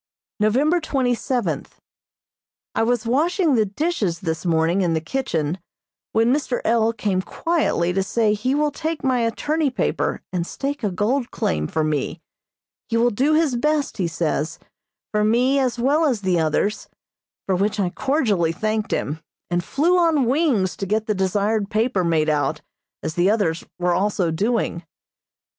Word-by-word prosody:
November 270 Hz, +11 st, +3 dB
twenty 265 Hz, -5 st, 0 dB
seventh: 245 Hz, +1 st, -3 dB, 0.9 s
I -, -, 0 dB
was 235 Hz, 0 st, +1 dB
washing 315 Hz, -, +2 dB
the 220 Hz, -4 st, +3 dB
dishes 205 Hz, -, -1 dB
this 160 Hz, -1 st, -3 dB
morning 165 Hz, +3 st, +2 dB
in 170 Hz, -3 st, +1 dB
the -, -, +1 dB
kitchen, 165 Hz, -, -2 dB, 0.5 s
when 230 Hz, +3 st, +3 dB
Mr. 270 Hz, -4 st, -1 dB
L. 225 Hz, 0 st, +3 dB
came 205 Hz, -4 st, -1 dB
quietly 300 Hz, -, 0 dB
to 195 Hz, -, +1 dB
say 210 Hz, +2 st, +1 dB
he 250 Hz, +6 st, 0 dB
will 300 Hz, 0 st, +1 dB
take 320 Hz, +2 st, -4 dB
my 260 Hz, -2 st, +2 dB
attorney 290 Hz, +7 st, 0 dB
paper 255 Hz, -, -1 dB
and 175 Hz, -1 st, -1 dB
stake 280 Hz, -1 st, -4 dB
a 210 Hz, -, +1 dB
gold 230 Hz, +8 st, 0 dB
claim 75 Hz, -1 st, -1 dB
for 160 Hz, -, -1 dB
me. 155 Hz, +2 st, -1 dB, 0.7 s
He 230 Hz, -, +1 dB
will 240 Hz, +1 st, +3 dB
do 275 Hz, +8 st, +2 dB
his 310 Hz, -5 st, +2 dB
best, 300 Hz, +4 st, 0 dB
he 185 Hz, -4 st, 0 dB
says, 160 Hz, -2 st, -2 dB, 0.5 s
for 210 Hz, 0 st, +1 dB
me 250 Hz, +6 st, +3 dB
as 255 Hz, -2 st, 0 dB
well 285 Hz, +7 st, +2 dB
as 250 Hz, -8 st, +1 dB
the 185 Hz, -3 st, +1 dB
others, 160 Hz, +6 st, 0 dB, 0.6 s
for 190 Hz, -, +1 dB
which 205 Hz, +3 st, 0 dB
I 180 Hz, -3 st, +1 dB
cordially 215 Hz, -, +1 dB
thanked 215 Hz, +4 st, -2 dB
him, 150 Hz, +3 st, -2 dB, 0.3 s
and 175 Hz, 0 st, +1 dB
flew 335 Hz, -, +2 dB
on 320 Hz, -6 st, +3 dB
wings 250 Hz, -, +1 dB
to 195 Hz, -, -4 dB
get 215 Hz, +2 st, 0 dB
the 215 Hz, -, 0 dB
desired 200 Hz, +2 st, 0 dB
paper 215 Hz, -3 st, +1 dB
made 160 Hz, -2 st, +2 dB
out, 150 Hz, -2 st, 0 dB, 0.4 s
as 160 Hz, -, -2 dB
the 175 Hz, +3 st, +2 dB
others 200 Hz, -7 st, +1 dB
were 180 Hz, 0 st, +1 dB
also 185 Hz, -2 st, +1 dB
doing. 200 Hz, -1 st, -1 dB
215 Hz, 165 wpm, -22 LUFS, 180-265 Hz, 0.9 s, November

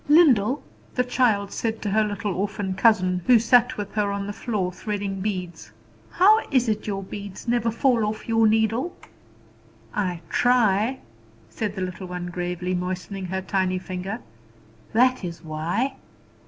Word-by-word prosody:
"Lyndall," 280 Hz, -, +5 dB, 0.3 s
the 250 Hz, -, +3 dB
child 230 Hz, -5 st, +1 dB
said 225 Hz, -1 st, -2 dB
to 205 Hz, -, -1 dB
her 215 Hz, +2 st, +3 dB
little 205 Hz, -1 st, -2 dB
orphan 200 Hz, 0 st, -2 dB
cousin, 185 Hz, -3 st, +3 dB
who 250 Hz, -2 st, +8 dB
sat 245 Hz, +2 st, +4 dB
with 205 Hz, -1 st, -4 dB
her 210 Hz, -2 st, 0 dB
on 200 Hz, 0 st, -3 dB
the 205 Hz, -, -4 dB
floor 205 Hz, -5 st, -2 dB
threading 200 Hz, -1 st, -3 dB
beads, 180 Hz, -, -4 dB, 0.4 s
"how 420 Hz, +5 st, +5 dB
is 255 Hz, -4 st, +2 dB
it 215 Hz, -1 st, -1 dB
your 195 Hz, -1 st, -2 dB
beads 200 Hz, +2 st, -8 dB
never 235 Hz, -1 st, +2 dB
fall 235 Hz, 0 st, +2 dB
off 215 Hz, +1 st, -4 dB
your 225 Hz, -1 st, +4 dB
needle?" 225 Hz, +8 st, +1 dB, 1.0 s
"I 180 Hz, -5 st, -1 dB
try," 240 Hz, 0 st, +2 dB, 0.5 s
said 210 Hz, -2 st, -3 dB
the 190 Hz, -, -4 dB
little 185 Hz, 0 st, -5 dB
one 175 Hz, 0 st, -5 dB
gravely, 180 Hz, +1 st, -3 dB
moistening 185 Hz, +1 st, -3 dB
her 190 Hz, +1 st, -3 dB
tiny 185 Hz, -1 st, 0 dB
finger. 185 Hz, -1 st, -5 dB, 0.7 s
"That 250 Hz, +1 st, +3 dB
is 170 Hz, -1 st, -6 dB
why." 170 Hz, -, -2 dB
205 Hz, 155 wpm, -24 LUFS, 185-230 Hz, 1.0 s, who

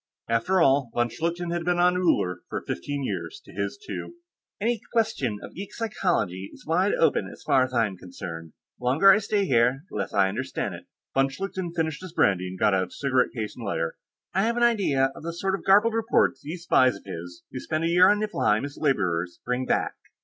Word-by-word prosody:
After 115 Hz, +12 st, +2 dB
all, 135 Hz, -5 st, +4 dB
von 120 Hz, 0 st, +2 dB
Schlichten 170 Hz, +6 st, -3 dB
had 170 Hz, 0 st, -1 dB
been 175 Hz, +1 st, +1 dB
on 180 Hz, +1 st, +4 dB
Uller 125 Hz, -, +1 dB
for -, -, -4 dB
fifteen 145 Hz, -1 st, -3 dB
years, 410 Hz, -, -4 dB
to -, -, -14 dB
his -, -, -3 dB
two. 400 Hz, -4 st, -7 dB, 0.4 s
"Any 230 Hz, +2 st, 0 dB
question 220 Hz, -, 0 dB
of -, -, -9 dB
geek 195 Hz, +2 st, -8 dB
psychology 170 Hz, -, -1 dB
is -, -, -16 dB
wide 180 Hz, +6 st, +2 dB
open 165 Hz, -, +2 dB
as -, -, -14 dB
far 130 Hz, -2 st, +4 dB
as 130 Hz, -, -9 dB
I'm 115 Hz, -6 st, 0 dB
concerned; 85 Hz, -3 st, -8 dB, 0.3 s
the 125 Hz, -, -8 dB
longer 155 Hz, +11 st, +6 dB
I 210 Hz, -, +5 dB
stay 205 Hz, -1 st, 0 dB
here, 125 Hz, -1 st, +2 dB
the -, -, -5 dB
less 100 Hz, -, -2 dB
I 100 Hz, -2 st, +3 dB
understand 125 Hz, +8 st, -3 dB
it." -, -, -11 dB, 0.3 s
Von 135 Hz, 0 st, +3 dB
Schlichten 185 Hz, +3 st, -4 dB
finished 160 Hz, -2 st, -1 dB
his 185 Hz, -3 st, -9 dB
brandy 95 Hz, -, +2 dB
and 95 Hz, +1 st, -7 dB
got 105 Hz, -, +3 dB
out 95 Hz, -1 st, 0 dB
cigarette 130 Hz, -3 st, +1 dB
case 110 Hz, -3 st, -4 dB
and 120 Hz, -, -9 dB
lighter. 80 Hz, -5 st, -2 dB, 0.4 s
"I 190 Hz, -, +2 dB
have 230 Hz, +3 st, +1 dB
an 240 Hz, -, +2 dB
idea 165 Hz, -, +3 dB
of -, -, -10 dB
the 165 Hz, +1 st, -4 dB
sort 190 Hz, +3 st, -1 dB
of 195 Hz, -, -3 dB
garbled 210 Hz, +4 st, +5 dB
reports 225 Hz, -, +2 dB
these 165 Hz, +4 st, -7 dB
spies 130 Hz, -, +4 dB
of 100 Hz, -, -13 dB
his 90 Hz, -2 st, -8 dB
who 130 Hz, -, -5 dB
spend 155 Hz, +4 st, -2 dB
a -, -, +2 dB
year 180 Hz, +2 st, +6 dB
on 205 Hz, 0 st, +3 dB
Niflheim 140 Hz, -, +1 dB
as 140 Hz, 0 st, -9 dB
laborers 90 Hz, -, 0 dB
bring 125 Hz, +1 st, -1 dB
back." -, -, +1 dB
140 Hz, 215 wpm, -26 LUFS, -, 0.4 s, longer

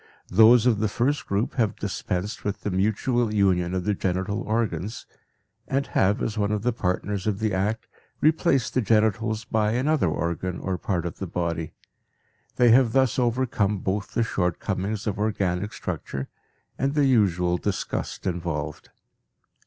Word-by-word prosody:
Those 110 Hz, +4 st, +6 dB
of 115 Hz, -4 st, +3 dB
the 110 Hz, -, +1 dB
first 125 Hz, +8 st, -1 dB
group 100 Hz, +3 st, -1 dB
have 110 Hz, -6 st, +1 dB
dispensed 100 Hz, 0 st, -3 dB
with 100 Hz, 0 st, -3 dB
the 105 Hz, -, -2 dB
mutual 110 Hz, +5 st, +1 dB
union 95 Hz, -4 st, +2 dB
of 90 Hz, -, -1 dB
the 105 Hz, -, +1 dB
genital 95 Hz, +2 st, -1 dB
organs, 110 Hz, -2 st, -2 dB, 0.6 s
and 135 Hz, +1 st, 0 dB
have, 100 Hz, +2 st, +1 dB
as 110 Hz, 0 st, -2 dB
one 100 Hz, 0 st, +1 dB
of 105 Hz, -1 st, -1 dB
the 125 Hz, 0 st, +1 dB
partners 100 Hz, 0 st, -2 dB
of 105 Hz, -2 st, 0 dB
the 110 Hz, -1 st, -1 dB
act, 105 Hz, +4 st, -1 dB, 0.3 s
replaced 155 Hz, -4 st, +2 dB
the 130 Hz, -, +2 dB
genitals 110 Hz, 0 st, +1 dB
by 110 Hz, -1 st, +1 dB
another 135 Hz, -, +2 dB
organ 85 Hz, +3 st, -2 dB
or 95 Hz, -2 st, -3 dB
part 90 Hz, -3 st, -2 dB
of 85 Hz, -, -5 dB
the 95 Hz, -, -4 dB
body; 85 Hz, -2 st, -3 dB, 0.8 s
they 120 Hz, -2 st, +5 dB
have 120 Hz, -1 st, +5 dB
thus 130 Hz, -2 st, +2 dB
overcome 120 Hz, -4 st, +1 dB
both 100 Hz, +2 st, -3 dB
the 115 Hz, -, +3 dB
short 90 Hz, -6 st, -1 dB
comings 100 Hz, +2 st, -3 dB
of 105 Hz, -2 st, -2 dB
organic 100 Hz, -2 st, -1 dB
structure 70 Hz, -8 st, -5 dB, 0.5 s
and 140 Hz, +2 st, 0 dB
the 145 Hz, -2 st, +4 dB
usual 90 Hz, -8 st, +2 dB
disgust 100 Hz, -2 st, -3 dB
involved. 80 Hz, -4 st, -3 dB
105 Hz, 160 wpm, -25 LUFS, 95-115 Hz, 0.8 s, Those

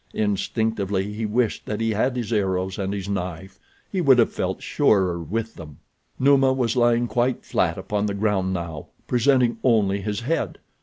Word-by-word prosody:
Instinctively 105 Hz, -1 st, -1 dB
he 110 Hz, +1 st, -3 dB
wished 115 Hz, +1 st, -1 dB
that 105 Hz, -, -3 dB
he 115 Hz, 0 st, 0 dB
had 120 Hz, +5 st, 0 dB
his 120 Hz, -2 st, -3 dB
arrows 95 Hz, -2 st, -1 dB
and 95 Hz, 0 st, -2 dB
his 100 Hz, -1 st, -4 dB
knife—he 95 Hz, -, -5 dB
would 135 Hz, -6 st, +5 dB
have 120 Hz, -, +3 dB
felt -, -, -3 dB
surer 90 Hz, -4 st, +2 dB
with 115 Hz, +7 st, -3 dB
them. 75 Hz, -4 st, -11 dB, 0.4 s
Numa 135 Hz, -1 st, +4 dB
was 125 Hz, -3 st, 0 dB
lying 120 Hz, -1 st, +3 dB
quite 120 Hz, +1 st, 0 dB
flat -, -, 0 dB
upon 105 Hz, 0 st, -2 dB
the 100 Hz, -, -2 dB
ground 100 Hz, -2 st, 0 dB
now, 85 Hz, -4 st, -5 dB, 0.2 s
presenting 125 Hz, -2 st, +2 dB
only 100 Hz, -5 st, +2 dB
his 105 Hz, +1 st, -3 dB
head. 160 Hz, +7 st, -2 dB
105 Hz, 165 wpm, -23 LUFS, 95-120 Hz, 0.4 s, would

